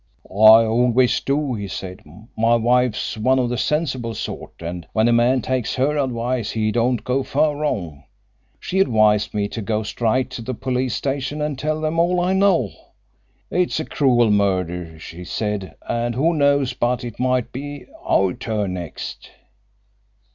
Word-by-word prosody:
"I 110 Hz, +3 st, +7 dB
always 120 Hz, +2 st, +2 dB
do," 140 Hz, -1 st, -1 dB
he 100 Hz, -3 st, -4 dB
said. 95 Hz, 0 st, -6 dB, 0.4 s
"My 115 Hz, +1 st, +3 dB
wife's 120 Hz, -1 st, +1 dB
one 130 Hz, +4 st, +3 dB
of 125 Hz, -2 st, +1 dB
the 125 Hz, -, -2 dB
sensible 130 Hz, -7 st, -1 dB
sort, -, -, -6 dB
and 85 Hz, 0 st, -6 dB
when 110 Hz, +1 st, +3 dB
a 120 Hz, -, +3 dB
man 120 Hz, +1 st, +3 dB
takes 130 Hz, -3 st, -1 dB
her 135 Hz, +3 st, +1 dB
advice 125 Hz, -4 st, -1 dB
he 110 Hz, -1 st, 0 dB
don't 120 Hz, +1 st, 0 dB
go 130 Hz, +2 st, 0 dB
far 145 Hz, +3 st, +1 dB
wrong. 100 Hz, -, -3 dB, 0.5 s
She 190 Hz, -, -2 dB
advised 110 Hz, -, +3 dB
me 100 Hz, -1 st, 0 dB
to 115 Hz, -, -5 dB
go 110 Hz, +1 st, -1 dB
straight 120 Hz, +4 st, -1 dB
to 120 Hz, -, -6 dB
the 125 Hz, +2 st, -4 dB
police 130 Hz, -1 st, -1 dB
station 140 Hz, +2 st, -3 dB
and 150 Hz, -1 st, -2 dB
tell 155 Hz, +1 st, -1 dB
them 155 Hz, +1 st, -1 dB
all 175 Hz, +1 st, +2 dB
I 180 Hz, +2 st, +1 dB
know. 190 Hz, -, +3 dB, 0.8 s
'It 180 Hz, 0 st, +1 dB
is -, -, -2 dB
a 155 Hz, -, -3 dB
cruel 120 Hz, -5 st, +2 dB
murder,' 90 Hz, -5 st, 0 dB
she 85 Hz, +2 st, -9 dB
said, 105 Hz, 0 st, -3 dB
'and 120 Hz, 0 st, -1 dB
who 160 Hz, +7 st, +2 dB
knows 140 Hz, -3 st, +2 dB
but 125 Hz, 0 st, -1 dB
it 120 Hz, -2 st, -7 dB
might 125 Hz, -1 st, 0 dB
be 145 Hz, +2 st, -7 dB, 0.2 s
our 95 Hz, -1 st, +2 dB
turn 105 Hz, -4 st, -3 dB
next?'" 85 Hz, -3 st, -7 dB
120 Hz, 170 wpm, -21 LUFS, 110-135 Hz, 0.8 s, I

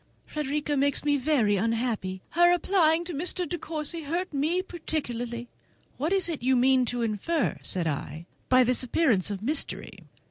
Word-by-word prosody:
Frederica 295 Hz, 0 st, -2 dB
makes 280 Hz, +1 st, +1 dB
me 290 Hz, -1 st, +3 dB
very 255 Hz, -7 st, +2 dB
unhappy! 225 Hz, -3 st, -1 dB
Her 345 Hz, +1 st, +5 dB
applying 345 Hz, -2 st, +3 dB
to 350 Hz, -, -5 dB
Mr. 355 Hz, +4 st, -1 dB
De 350 Hz, -, -4 dB
Courcy 315 Hz, +1 st, -3 dB
hurt 335 Hz, +4 st, -3 dB
me 315 Hz, +6 st, 0 dB
particularly." 245 Hz, -9 st, -4 dB, 0.5 s
"What 305 Hz, +6 st, -1 dB
is 390 Hz, -2 st, +2 dB
it 325 Hz, -7 st, -3 dB
you 260 Hz, +2 st, +3 dB
mean 255 Hz, 0 st, +4 dB
to 245 Hz, 0 st, -2 dB
infer," 230 Hz, -, -1 dB
said 180 Hz, -3 st, -1 dB
I, 155 Hz, +1 st, -4 dB, 0.2 s
"by 255 Hz, 0 st, +6 dB
this 250 Hz, 0 st, +1 dB
appearance 245 Hz, -, +2 dB
of 200 Hz, -1 st, -5 dB
mystery? 290 Hz, +5 st, -2 dB
280 Hz, 165 wpm, -27 LUFS, 235-325 Hz, 0.5 s, by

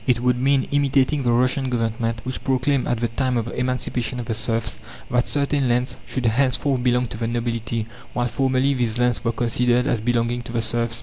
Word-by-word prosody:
It 125 Hz, -2 st, +3 dB
would 125 Hz, 0 st, +2 dB
mean 135 Hz, +1 st, +2 dB
imitating 140 Hz, 0 st, +2 dB
the 120 Hz, -2 st, +1 dB
Russian 130 Hz, +2 st, +2 dB
Government, 115 Hz, -1 st, -1 dB
which 130 Hz, 0 st, -4 dB
proclaimed, 130 Hz, +1 st, +1 dB
at 120 Hz, -1 st, -1 dB
the 120 Hz, -, +2 dB
time 125 Hz, +1 st, -1 dB
of 115 Hz, -, -1 dB
the 120 Hz, -, -6 dB
emancipation 125 Hz, -1 st, -2 dB
of 120 Hz, -, -4 dB
the 115 Hz, -, -2 dB
serfs, 110 Hz, -, -1 dB, 0.3 s
that 125 Hz, 0 st, +2 dB
certain 140 Hz, -2 st, 0 dB
lands 125 Hz, +1 st, 0 dB
should 130 Hz, -2 st, -3 dB
henceforth 130 Hz, +3 st, +2 dB
belong 125 Hz, 0 st, +2 dB
to -, -, -6 dB
the 115 Hz, 0 st, -2 dB
nobility, 115 Hz, -1 st, -2 dB, 0.3 s
while 120 Hz, 0 st, 0 dB
formerly 130 Hz, +2 st, +1 dB
these 120 Hz, -3 st, 0 dB
lands 125 Hz, -1 st, +1 dB
were 115 Hz, -, +1 dB
considered 120 Hz, +1 st, +1 dB
as 115 Hz, -, +1 dB
belonging 120 Hz, +1 st, 0 dB
to 120 Hz, -, -9 dB
the 115 Hz, -, +1 dB
serfs. 115 Hz, 0 st, -1 dB
125 Hz, 205 wpm, -22 LUFS, 115-130 Hz, 0.3 s, It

